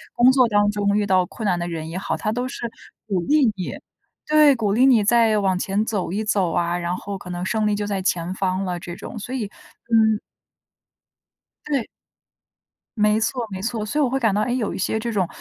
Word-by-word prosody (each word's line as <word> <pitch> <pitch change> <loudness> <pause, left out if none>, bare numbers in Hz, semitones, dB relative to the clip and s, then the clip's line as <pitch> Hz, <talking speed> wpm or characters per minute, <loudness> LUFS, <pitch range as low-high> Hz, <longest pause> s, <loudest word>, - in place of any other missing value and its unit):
工 245 +2 +6
作 260 -2 +4
当 205 -1 +3
中 205 0 +1
遇 210 - +1
到 185 -2 +3
困 220 - -7
难 180 -3 +1
的 175 - -3
人 160 -2 -5
也 165 - -7
好， - - -2
它 215 - -2
都 245 +2 -2
是 240 -2 -5 0.4
鼓 195 -4 0
励 290 - +3
你。 185 -2 -5 0.5
对， 300 -2 +6
鼓 210 -4 0
励 250 +4 +4
你 230 -5 +5
再 225 -1 +4
往 190 -2 +1
前 195 +3 -1
走 200 -6 -2
一 205 +4 -1
走 195 -5 +1
啊， 175 +1 0
然 175 +1 -2
后 200 0 -6
可 180 - -11
能 175 +1 -4
胜 215 +1 0
利 210 - +1
就 205 0 -2
在 195 -2 -2
前 175 -1 -1
方 190 0 -1
了 180 -1 -2
这 175 -1 -7
种， 225 - -8
所 245 +5 -6
以 235 -5 -2 0.5
嗯。 220 -1 +4 1.5
对。 280 -6 -1 1.1
没 210 +1 +3
错 240 +2 -1
没 190 - -5
错， 220 0 -2
所 290 +8 -2
以 - - +4
我 255 - +1
会 270 - 0
感 225 -5 +2
到 205 - +1
诶， 245 +3 0
有 225 -5 -1
一 - - -5
些 205 +4 -1
这 230 +1 -3
种 190 -4 +1
210 Hz, 240 characters per minute, -22 LUFS, 185-230 Hz, 1.5 s, 工